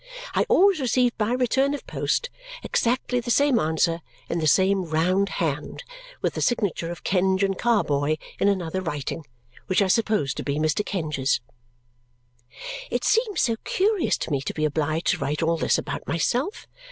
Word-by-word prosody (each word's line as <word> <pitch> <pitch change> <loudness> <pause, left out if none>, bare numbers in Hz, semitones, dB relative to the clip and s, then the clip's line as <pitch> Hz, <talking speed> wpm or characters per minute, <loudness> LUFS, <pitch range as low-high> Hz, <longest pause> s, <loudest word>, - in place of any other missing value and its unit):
I - - +1
always 390 -2 +5
received 250 -2 +2
by 215 +3 +1
return 265 +3 +1
of - - -9
post 485 - -1 0.3
exactly 245 +1 0
the 240 0 -6
same 280 -1 +4
answer 165 +1 +1 0.3
in 170 - -1
the 155 - 0
same 190 +3 +3
round 180 +5 +1
hand, 150 -4 -2 0.4
with - - +1
the - - -4
signature 200 -8 0
of 175 - -7
Kenge 190 +1 +2
and 195 -1 +1
Carboy 155 -11 +1 0.2
in - - +3
another 185 -2 0
writing, 150 -2 -4 0.4
which 185 - +2
I 200 - +4
supposed 210 - +1
to - - -3
be 140 - -2
Mr. 155 +6 +1
Kenge's. 150 -9 -1 1.5
It - - -2
seems 445 -4 +2
so 230 -2 +1
curious 400 -1 +1
to - - -5
me 140 -2 0
to - - -5
be 155 - 0
obliged 155 +2 -1
to - - +2
write 150 +3 -1
all 165 +1 +2
this - - +2
about 145 -1 -5
myself! 245 - -1
185 Hz, 170 wpm, -24 LUFS, 155-240 Hz, 1.5 s, always